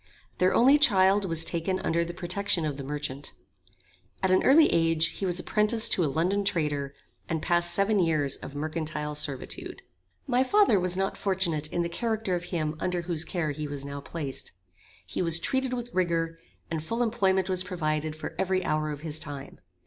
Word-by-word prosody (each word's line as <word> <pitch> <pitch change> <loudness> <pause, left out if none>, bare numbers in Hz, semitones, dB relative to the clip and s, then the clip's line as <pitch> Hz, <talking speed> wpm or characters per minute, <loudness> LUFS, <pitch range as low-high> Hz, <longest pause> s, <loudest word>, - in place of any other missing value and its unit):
Their 185 +1 +3
only 270 +5 +6
child 195 -5 +4
was 165 -2 +2
taken 175 +3 -1
under 170 +1 +1
the 170 - -5
protection 175 0 -1
of 145 -2 -3
the 140 - -6
merchant. 145 0 -4 0.9
At 190 - +2
an 185 - +4
early 305 +4 +6
age 165 -1 +2
he 195 - -4
was 180 0 +4
apprenticed 215 +4 +2
to 180 - +2
a 150 - +1
London 180 +8 0
trader, 150 -7 -1 0.3
and 160 - -1
passed 175 +1 +2
seven 200 +1 +2
years 155 -6 +1
of 140 - -10
mercantile 155 0 -3
servitude. 145 -3 -3 0.4
My 250 +1 +2
father 335 - +4
was 180 0 +1
not 195 0 -1
fortunate 175 -6 0
in 175 - 0
the - - -1
character 220 +2 -2
of 175 0 -2
him 155 -4 -2
under 180 -1 -2
whose 170 -2 0
care 160 -3 -2
he 150 +1 -5
was 140 -1 -6
now 140 0 -6
placed. 140 -2 -5 0.5
He - - -3
was 165 -2 +5
treated 265 +7 0
with 245 -1 -5
rigor, 165 -2 0 0.3
and 160 -2 -2
full 230 +8 -1
employment 190 -5 +1
was 185 -1 +3
provided 155 -4 -2
for 155 - -7
every 185 -1 0
hour 155 0 0
of 145 -1 -6
his 155 -1 -3
time. 145 -2 -6
170 Hz, 185 wpm, -27 LUFS, 155-190 Hz, 0.9 s, only